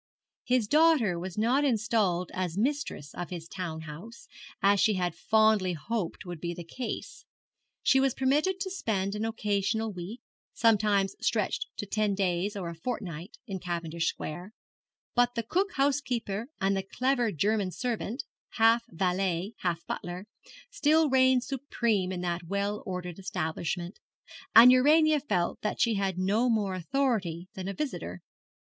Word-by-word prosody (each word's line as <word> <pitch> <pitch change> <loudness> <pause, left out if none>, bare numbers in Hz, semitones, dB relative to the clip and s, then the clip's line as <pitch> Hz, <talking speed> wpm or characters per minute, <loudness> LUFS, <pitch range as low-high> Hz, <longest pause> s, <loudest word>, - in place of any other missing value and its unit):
His 250 -4 +2
daughter 295 - +4
was 185 +1 -6
not 245 +6 +2
installed 215 - +1
as 185 -2 -2
mistress 255 - -2
of 175 - -5
his 170 -2 -6
town 170 -3 -5
house, 165 +10 -10 0.3
as 200 0 +4
she 215 +1 +3
had 180 -2 -1
fondly 215 -4 +3
hoped 180 +4 -4
would 175 -2 -6
be 170 0 -3
the 175 - -7
case. 245 +9 -6 0.6
She 265 - +5
was 265 -2 +2
permitted 300 +9 +1
to 380 - -2
spend 200 - -1
an 210 +1 -2
occasional 220 0 -1
week, 185 +7 -7 0.4
sometimes 210 -4 +3
stretched 485 - 0
to - - -4
ten 210 0 0
days 190 +1 0
or 190 -4 -4
a 170 - -5
fortnight, 180 -2 -5
in 195 -5 -5
Cavendish 170 -2 -2
Square; 175 +7 -5 0.6
but 245 0 +2
the 230 - -1
cook 380 - 0
housekeeper 250 -6 0
and 195 +1 +2
the 195 - 0
clever 245 +3 0
German 200 +3 +1
servant, 240 +3 -3 0.3
half 225 +1 +5
valet 185 +2 -1
half 170 -2 -2
butler, 180 +2 -5 0.5
still 310 - +3
reigned 260 -1 +4
supreme 235 -8 -1
in 180 -1 -3
that 175 -1 -2
well 200 +3 -2
ordered 180 -1 -5
establishment; 175 0 -3 0.6
and 235 +3 +11
Urania 305 +4 +5
felt 185 -11 -1
that 210 - -2
she 235 -1 +3
had 195 -3 -1
no 205 +7 +2
more 210 -4 +1
authority 185 -4 -1
than 190 -1 -6
a 195 - -2
visitor. 90 - -4
205 Hz, 150 wpm, -29 LUFS, 180-245 Hz, 0.6 s, and